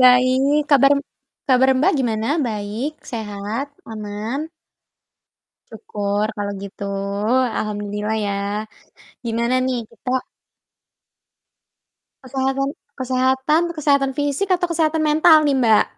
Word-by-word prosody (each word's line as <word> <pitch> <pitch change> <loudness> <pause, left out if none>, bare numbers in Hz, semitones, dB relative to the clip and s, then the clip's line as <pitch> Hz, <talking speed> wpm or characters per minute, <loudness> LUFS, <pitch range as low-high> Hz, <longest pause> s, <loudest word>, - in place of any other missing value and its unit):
Baik, 255 +3 +5
kabar 275 -1 +6
m - - 0 0.5
kabar, 260 0 +5
Mbak, 285 - +3
gimana? 225 -3 -1 0.2
Baik? 215 +5 -3 0.2
Sehat? 220 +4 -4 0.2
Aman? 220 +7 -5 1.2
Syukur 205 - -2
kalau 205 0 -2
gitu. 200 +1 -8 0.7
Alhamdulillah, 210 0 -2
ya. 200 - -1 0.9
Gimana 235 +2 0
nih 260 -1 0
kita 250 - -7 2.1
Kesehatan 270 +1 -1 0.3
kesehatan, 260 +4 +1 0.2
kesehatan 280 -2 +2
fisik, 290 +6 -1
atau 360 -1 +2
kesehatan 320 -2 +1
mental 310 +1 +6
nih, 285 - +3
Mbak? 230 -5 +4
255 Hz, 100 wpm, -21 LUFS, 215-285 Hz, 2.1 s, kabar